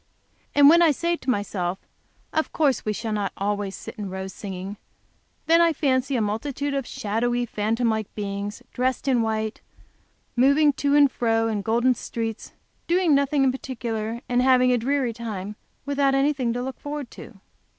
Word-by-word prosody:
And 285 Hz, -1 st, +8 dB
when 335 Hz, +3 st, +7 dB
I 335 Hz, -, +6 dB
say 340 Hz, +4 st, 0 dB
to 260 Hz, -, -6 dB
myself, 195 Hz, -5 st, -1 dB, 0.6 s
"Of 315 Hz, -, 0 dB
course 285 Hz, -5 st, +1 dB
we 215 Hz, -, -1 dB
shall 220 Hz, +1 st, -3 dB
not 205 Hz, -2 st, -1 dB
always 200 Hz, 0 st, -2 dB
sit -, -, -8 dB
in 205 Hz, -2 st, -4 dB
rows 190 Hz, 0 st, -6 dB
singing," 195 Hz, 0 st, -6 dB, 0.7 s
then 330 Hz, +1 st, +5 dB
I 335 Hz, -1 st, +4 dB
fancy 270 Hz, -2 st, +1 dB
a 235 Hz, -, +1 dB
multitude 280 Hz, +7 st, -2 dB
of 275 Hz, -3 st, -2 dB
shadowy, 240 Hz, +3 st, -1 dB
phantom 225 Hz, +2 st, -1 dB
like 220 Hz, -2 st, -3 dB
beings, 205 Hz, +2 st, -4 dB
dressed 260 Hz, +2 st, -1 dB
in 250 Hz, -3 st, +3 dB
white, 220 Hz, -1 st, -2 dB, 0.7 s
moving 280 Hz, +4 st, +4 dB
to 285 Hz, +1 st, +1 dB
and 285 Hz, -2 st, +6 dB
fro 225 Hz, -1 st, +1 dB
in 215 Hz, -2 st, -1 dB
golden 235 Hz, +5 st, +2 dB
streets, 225 Hz, -2 st, -5 dB, 0.3 s
doing 345 Hz, -2 st, +3 dB
nothing 280 Hz, 0 st, +2 dB
in 265 Hz, -, +4 dB
particular, 235 Hz, -3 st, -4 dB
and 245 Hz, 0 st, +2 dB
having 255 Hz, -1 st, +4 dB
a -, -, +3 dB
dreary 260 Hz, 0 st, 0 dB
time, 210 Hz, -3 st, -6 dB, 0.3 s
without 280 Hz, -1 st, +2 dB
anything 270 Hz, -3 st, +1 dB
to 245 Hz, +1 st, -3 dB
look 265 Hz, 0 st, -6 dB
forward 290 Hz, -3 st, -6 dB
to. 215 Hz, -5 st, -12 dB
245 Hz, 170 wpm, -24 LUFS, 215-280 Hz, 0.7 s, And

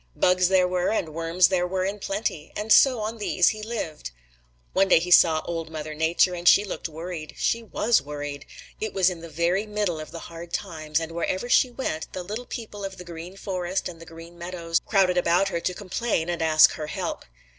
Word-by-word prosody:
Bugs 180 Hz, 0 st, +3 dB
there 185 Hz, -1 st, +4 dB
were 180 Hz, 0 st, 0 dB
and 165 Hz, -8 st, -2 dB
worms 165 Hz, +2 st, +3 dB
there 180 Hz, -2 st, +1 dB
were 185 Hz, 0 st, -1 dB
in 200 Hz, +2 st, -3 dB
plenty, 195 Hz, -6 st, -3 dB
and 215 Hz, +1 st, +4 dB
on 225 Hz, -3 st, -4 dB
these 185 Hz, -4 st, +3 dB
he 215 Hz, -, -5 dB
lived. 210 Hz, -, -5 dB, 0.6 s
One 195 Hz, +1 st, +3 dB
day 185 Hz, -, +6 dB
he 175 Hz, +2 st, -2 dB
saw 160 Hz, -2 st, +6 dB
Old 165 Hz, -1 st, -4 dB
Mother 155 Hz, -1 st, -6 dB
Nature, 160 Hz, +4 st, +2 dB
and 175 Hz, 0 st, -4 dB
she 205 Hz, -, +7 dB
looked 185 Hz, -, -5 dB
worried. 160 Hz, 0 st, -7 dB
She 230 Hz, -, 0 dB
was 225 Hz, 0 st, +1 dB
worried. 145 Hz, -1 st, -6 dB, 0.3 s
It 220 Hz, -1 st, -4 dB
was 190 Hz, -1 st, +4 dB
in 170 Hz, -2 st, -8 dB
the 170 Hz, -, -9 dB
very 170 Hz, +6 st, 0 dB
middle 205 Hz, -6 st, -1 dB
of 155 Hz, -, -7 dB
the 165 Hz, -, -8 dB
hard 170 Hz, 0 st, -10 dB
times 155 Hz, -5 st, -2 dB
and 165 Hz, 0 st, -5 dB
wherever 185 Hz, +6 st, -2 dB
she 250 Hz, +1 st, +4 dB
went, 240 Hz, -11 st, -4 dB
the 185 Hz, -, -4 dB
little 215 Hz, +7 st, -6 dB
people 215 Hz, -5 st, -7 dB
of 195 Hz, -1 st, -5 dB
the 180 Hz, -, -10 dB
Green 170 Hz, +2 st, -9 dB
Forest 185 Hz, -1 st, -3 dB
and 165 Hz, -2 st, -10 dB
the 165 Hz, -, -12 dB
Green 165 Hz, +1 st, -12 dB
Meadows 170 Hz, -1 st, -2 dB
crowded 185 Hz, -3 st, +3 dB
about 175 Hz, +3 st, +2 dB
her 170 Hz, -, -2 dB
to 175 Hz, -, -1 dB
complain 190 Hz, -3 st, -2 dB
and 170 Hz, -1 st, -2 dB
ask 155 Hz, -1 st, +6 dB
her 155 Hz, -1 st, -6 dB
help. -, -, -4 dB
180 Hz, 210 wpm, -25 LUFS, 165-195 Hz, 0.6 s, she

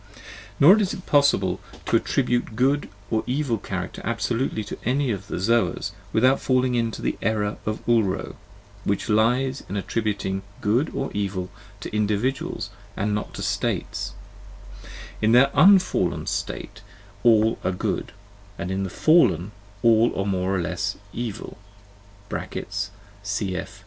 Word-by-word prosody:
Nor 185 Hz, +10 st, +8 dB
is 200 Hz, -2 st, 0 dB
it 185 Hz, -, -10 dB
possible 100 Hz, -11 st, +3 dB, 0.3 s
to -, -, +1 dB
attribute 120 Hz, -2 st, +1 dB
a -, -, -12 dB
good 135 Hz, +5 st, +1 dB, 0.2 s
or 110 Hz, -1 st, +1 dB
evil 130 Hz, -4 st, 0 dB
character 90 Hz, -2 st, -5 dB
abso 115 Hz, +3 st, -2 dB
lutely 115 Hz, -3 st, -1 dB
to 105 Hz, -, -7 dB
any 130 Hz, +2 st, +1 dB
of 100 Hz, -1 st, -4 dB
the -, -, -4 dB
Zoas 115 Hz, +5 st, +1 dB, 0.2 s
without 130 Hz, +4 st, +3 dB
falling 130 Hz, -1 st, +2 dB
into 115 Hz, -2 st, -1 dB
the -, -, -1 dB
error 105 Hz, -2 st, 0 dB
of 110 Hz, 0 st, -3 dB
Ulro, 110 Hz, -5 st, +1 dB, 0.5 s
which 100 Hz, +3 st, -1 dB
lies 125 Hz, +5 st, +2 dB
in 100 Hz, -, -2 dB
attributing 100 Hz, -2 st, -2 dB, 0.2 s
good 120 Hz, +9 st, +1 dB
or 135 Hz, -, -2 dB
evil 95 Hz, -3 st, -2 dB, 0.3 s
to -, -, -6 dB
individuals 105 Hz, +3 st, -1 dB, 0.3 s
and 105 Hz, +1 st, 0 dB
not 105 Hz, -, -3 dB
to -, -, -5 dB
states: -, -, -2 dB, 1.1 s
in 110 Hz, +2 st, +3 dB
their 135 Hz, +3 st, +6 dB
unfallen 190 Hz, -1 st, +4 dB
state 105 Hz, +1 st, -4 dB, 0.4 s
all 110 Hz, -1 st, +4 dB
are -, -, +1 dB
good, 90 Hz, -, -2 dB, 0.5 s
in 95 Hz, +3 st, -2 dB
the 95 Hz, -, -2 dB
fallen 105 Hz, -, +3 dB, 0.3 s
all 115 Hz, -2 st, +4 dB
are 95 Hz, -, 0 dB
more 95 Hz, -1 st, 0 dB
or 90 Hz, -, 0 dB
less 90 Hz, +4 st, -2 dB, 0.2 s
evil 115 Hz, -3 st, -5 dB, 0.7 s
(cf. 100 Hz, -1 st, -4 dB
110 Hz, 140 wpm, -24 LUFS, 100-125 Hz, 1.1 s, Nor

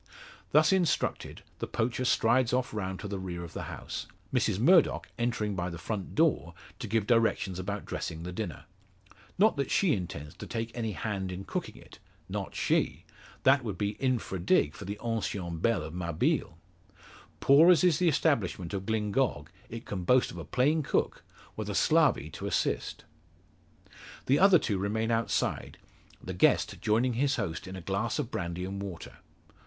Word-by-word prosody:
Thus -, -, +5 dB
instructed, 180 Hz, -4 st, 0 dB, 0.2 s
the -, -, -3 dB
poacher 125 Hz, +3 st, -1 dB
strides 120 Hz, +1 st, +3 dB
off 125 Hz, -2 st, 0 dB
round 95 Hz, -3 st, -3 dB
to 105 Hz, -, -5 dB
the 100 Hz, -1 st, -4 dB
rear 90 Hz, -2 st, -5 dB
of 85 Hz, -, -9 dB
the -, -, -5 dB
house; -, -, -6 dB, 0.3 s
Mrs -, -, +1 dB
Murdock 165 Hz, -, +4 dB
entering 115 Hz, -4 st, -1 dB
by 90 Hz, 0 st, -2 dB
the 85 Hz, -, -7 dB
front 100 Hz, +1 st, -5 dB
door 150 Hz, -, +2 dB, 0.2 s
to 125 Hz, -, -5 dB
give 110 Hz, 0 st, +1 dB
directions 110 Hz, -5 st, +1 dB
about 100 Hz, +2 st, -4 dB
dressing 80 Hz, 0 st, -5 dB
the 90 Hz, -, -5 dB
dinner. 105 Hz, +4 st, -5 dB, 0.7 s
Not 210 Hz, -2 st, +4 dB
that 140 Hz, -2 st, -1 dB
she 185 Hz, -6 st, +3 dB
intends 75 Hz, -6 st, -5 dB
to -, -, -8 dB
take 115 Hz, 0 st, -3 dB
any 115 Hz, -3 st, -2 dB
hand 95 Hz, -3 st, -3 dB
in 90 Hz, +2 st, -6 dB
cooking -, -, -4 dB
it -, -, -15 dB, 0.3 s
not -, -, -5 dB
she. -, -, 0 dB, 0.4 s
That 135 Hz, 0 st, +5 dB
would 105 Hz, -6 st, -4 dB
be 100 Hz, +1 st, 0 dB
infra 125 Hz, -8 st, -1 dB
dig 75 Hz, -3 st, +2 dB
for 100 Hz, -, -9 dB
the 100 Hz, +2 st, -5 dB
ancien 100 Hz, -7 st, -2 dB
belle 110 Hz, -2 st, +1 dB
of 80 Hz, +1 st, -7 dB
Mabille. 85 Hz, -1 st, -1 dB, 0.8 s
Poor 150 Hz, +5 st, +6 dB
as 180 Hz, 0 st, +6 dB
is 175 Hz, -5 st, +4 dB
the 180 Hz, -2 st, +4 dB
establishment 110 Hz, -, 0 dB
of 95 Hz, -1 st, -4 dB
Glyngog, 105 Hz, -, 0 dB, 0.2 s
it 115 Hz, +1 st, -7 dB
can 95 Hz, -3 st, -4 dB
boast 125 Hz, +7 st, +3 dB
of -, -, -10 dB
a -, -, -5 dB
plain 150 Hz, +5 st, +2 dB
cook, 140 Hz, -, -1 dB, 0.3 s
with -, -, -4 dB
a -, -, -3 dB
slavey -, -, +3 dB
to -, -, -6 dB
assist. -, -, -1 dB, 1.2 s
The 140 Hz, +3 st, +3 dB
other 195 Hz, -1 st, +7 dB
two 105 Hz, -, -1 dB
remain 110 Hz, +4 st, -1 dB
outside, 115 Hz, 0 st, -1 dB, 0.5 s
the 95 Hz, -, -5 dB
guest 90 Hz, -, +2 dB
joining 120 Hz, +4 st, +2 dB
his 135 Hz, +4 st, +1 dB
host 90 Hz, -8 st, -4 dB
in 95 Hz, -, -7 dB
a 95 Hz, -, -7 dB
glass 100 Hz, +6 st, -1 dB
of 135 Hz, -5 st, -3 dB
brandy 85 Hz, +1 st, -3 dB
and 100 Hz, +1 st, -5 dB
water. 95 Hz, -4 st, -8 dB
105 Hz, 175 wpm, -29 LUFS, 95-125 Hz, 1.2 s, other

